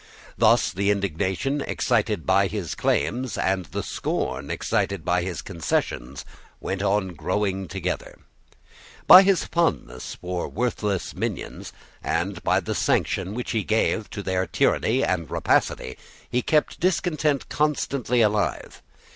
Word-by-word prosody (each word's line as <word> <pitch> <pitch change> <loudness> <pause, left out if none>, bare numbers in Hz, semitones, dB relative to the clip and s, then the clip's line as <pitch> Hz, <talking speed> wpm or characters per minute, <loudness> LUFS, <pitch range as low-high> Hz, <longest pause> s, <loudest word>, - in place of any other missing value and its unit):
Thus - - +4
the 100 +2 0
indignation 100 - -1
excited - - 0
by - - +3
his - - -4
claims 125 0 -1
and 95 -1 0
the - - -4
scorn - - -3
excited 100 -5 -1
by 90 +1 +2
his 90 -1 -4
concessions 70 -6 -3 0.3
went 95 0 -3
on 100 -1 +1
growing 95 +3 -2
together. 90 +2 -4 0.9
By 185 - +11
his 195 -2 +2
fondness 160 - -1
for 90 0 -4
worthless 105 -6 -2
minions, - - -5 0.3
and - - -1
by - - +2
the - - -3
sanction 95 +2 0
which 125 - -4
he 110 -3 0
gave 110 0 0
to 100 - -6
their 95 -1 -1
tyranny 125 +4 +2
and 85 -5 -1
rapacity, 65 - 0 0.3
he 125 +1 0
kept 150 +4 +1
discontent 155 -5 +1
constantly 140 -5 0
alive. 105 -1 0
100 Hz, 130 wpm, -24 LUFS, 95-125 Hz, 0.9 s, By